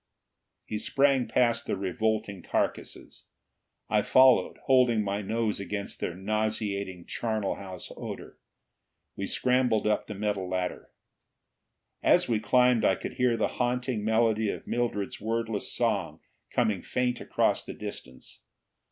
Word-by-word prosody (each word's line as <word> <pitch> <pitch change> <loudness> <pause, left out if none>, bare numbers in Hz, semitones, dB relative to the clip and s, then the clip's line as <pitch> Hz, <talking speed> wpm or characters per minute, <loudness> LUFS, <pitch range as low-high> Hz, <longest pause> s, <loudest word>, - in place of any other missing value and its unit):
He 105 - -3
sprang 135 -1 +2
past 120 -1 +1
the - - -1
revolting 100 0 -1
carcasses. - - -3 0.6
I 105 -1 +2
followed, 130 +3 +5
holding 125 -4 +4
my 100 +1 -2
nose 110 +1 -1
against 100 0 -5
their 85 - -3
nauseating, 100 -2 -2
charnel 110 -4 -2
house 95 -2 -8
odor. - - -8 0.8
We 100 - -3
scrambled 125 -2 +2
up 105 0 +1
the 105 - -6
metal 100 -2 -2
ladder. 90 -1 -3 1.1
As - - +4
we 115 -3 +1
climbed, 125 +1 +3
I 95 - +4
could - - -6
hear 125 -2 +2
the - - +1
haunting 125 -2 0
melody 110 -1 +2
of - - -5
Mildred's 115 -6 -2
wordless 115 -1 -2
song - - -1 0.3
coming 110 -6 +1
faint 125 -1 -1
across - - +1
the - - -8
distance. 65 -1 -9
110 Hz, 130 wpm, -28 LUFS, 100-120 Hz, 1.1 s, followed